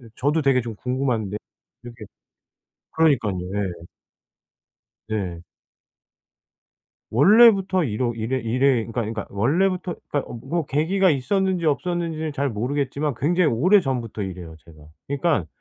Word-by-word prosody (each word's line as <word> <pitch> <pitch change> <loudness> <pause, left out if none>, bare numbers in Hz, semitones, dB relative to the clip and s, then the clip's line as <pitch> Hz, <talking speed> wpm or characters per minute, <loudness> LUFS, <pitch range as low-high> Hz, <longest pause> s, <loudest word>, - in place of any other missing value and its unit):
저도 150 +4 +1
되게 135 -3 +3
좀 115 -2 -7
궁금한데 125 -4 -2 0.5
이렇게 120 -2 -10 0.9
그러니깐요. 115 - +1
예. 90 -4 -3 1.2
네. 95 -6 -3 1.7
원래부터 195 - +5
이러 120 0 -1
이래 115 +4 -2
이래 125 +3 +1 0.2
그러니까, 115 - -9
그러니까 110 -1 -4
원래부터 175 - 0 0.2
그러니까 145 - -2
어 - - -6
뭐 165 +3 -2
계기가 180 +8 +2
있었는지 185 +5 0
없었는지는 160 0 -1
잘 140 0 -1
모르겠지만 140 +5 -2
굉장히 170 +3 +2
오래전부터 130 - +1
이래요, 90 -4 -7
제가. 85 -2 -17 0.3
그러니깐 140 - 0
135 Hz, 315 characters per minute, -23 LUFS, 110-165 Hz, 1.7 s, 원래부터